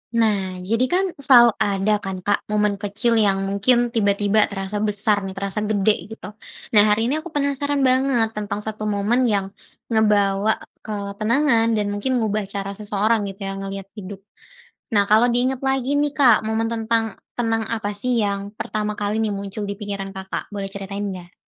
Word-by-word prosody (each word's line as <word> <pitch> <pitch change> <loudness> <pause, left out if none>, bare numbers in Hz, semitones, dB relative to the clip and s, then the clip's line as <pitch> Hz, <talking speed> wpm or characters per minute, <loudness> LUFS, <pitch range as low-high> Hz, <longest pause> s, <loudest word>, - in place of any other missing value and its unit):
Nah, 200 -5 +1
jadi 225 +6 +1
kan, 365 +7 +1 0.2
selalu 245 -4 +7
ada 200 +1 +1
kan, 190 -2 -6
Kak, 205 +1 +2
momen 210 -1 0
kecil 220 +3 0
yang 195 -2 +2
mungkin 235 +5 +2
tiba-tiba 205 -1 +2
terasa 195 +1 -4
besar 210 0 +1
nih, 190 - -7
terasa 200 +1 -3
gede, 210 0 0
gitu. - - -10 0.4
Nah, 210 -2 +7
hari 225 +4 +2
ini 305 - 0
aku 325 - -8
penasaran 285 0 0
banget 255 -3 +2
tentang 210 -1 -4
1 215 0 -4
momen 210 +5 +1
yang 200 -3 0 0.4
ngebawa 210 -1 +2 0.2
ketenangan 225 +4 +1
dan 210 -1 0
mungkin 235 +4 0
ngubah 210 -1 -1
cara 200 0 -4
seseorang, 210 +1 0
gitu 195 0 -8
ya, - - -2
ngelihat 195 0 -6
hidup. 195 0 -9 0.7
Nah, 205 -2 +3
kalau 220 +4 +4
di 240 - +1
ingat 265 0 -3
lagi 270 +1 0
nih, 290 0 +1
Kak, 270 -5 +4
momen 220 +1 -1
tentang 225 -1 -1 0.2
tenang 225 -1 +1
apa 210 -2 -2
sih 245 +3 0
yang 200 -1 -2
pertama 210 0 -2
kali 210 +2 0
nih 215 - -1
muncul 200 +1 -5
di 200 0 -5
pikiran 200 -2 -5
Kakak, 190 +1 -6
boleh 200 -1 -4
ceritain 200 +1 -6
nggak? 180 -1 -12
210 Hz, 175 wpm, -22 LUFS, 200-230 Hz, 0.7 s, selalu